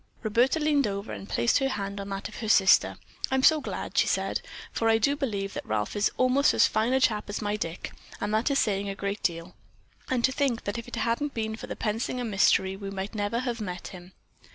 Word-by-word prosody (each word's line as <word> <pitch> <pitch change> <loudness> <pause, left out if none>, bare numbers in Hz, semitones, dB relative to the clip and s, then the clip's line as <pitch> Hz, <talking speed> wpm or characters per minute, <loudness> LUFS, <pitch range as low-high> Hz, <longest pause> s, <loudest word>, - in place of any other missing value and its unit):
Roberta 240 +8 +2
leaned 295 -4 +2
over 200 +1 -4
and 195 - -8
placed 235 - +2
her 270 -1 +1
hand 200 -5 -4
on 200 - -7
that 195 +1 -4
of - - -11
her 220 - -4
sister. 195 -2 +5 0.3
"I'm 265 0 +1
so 310 +1 +6
glad," - - -5
she - - +3
said, - - 0 0.3
"for 225 - +1
I 225 - +5
do 280 +6 +2
believe 205 -8 -3
that - - -5
Ralph 105 -1 -2
is 205 0 +2
almost 255 +3 +3
as - - +6
fine 220 +3 +1
a 265 - +4
chap 215 -5 +1
as 205 - -3
my 205 -1 -1
Dick, 170 -4 -5 0.3
and 205 +1 -2
that 220 +6 +2
is 280 - +2
saying 200 -4 0
a 195 - -4
great 200 +1 -3
deal; 170 -1 -2 0.6
and 250 -2 0
to 260 - +2
think 260 -4 0
that 205 +4 -3
if 230 - -9
it - - -6
hadn't 235 +6 -1
been 220 -1 -2
for - - -9
the - - -5
Pensinger 230 +3 -2
mystery, 195 -2 +3
we 195 0 -6
might 195 +2 -5
never 215 +3 -1
have 240 -3 -3
met 180 -3 -5
him." 180 0 -12
215 Hz, 235 wpm, -27 LUFS, 200-250 Hz, 0.6 s, so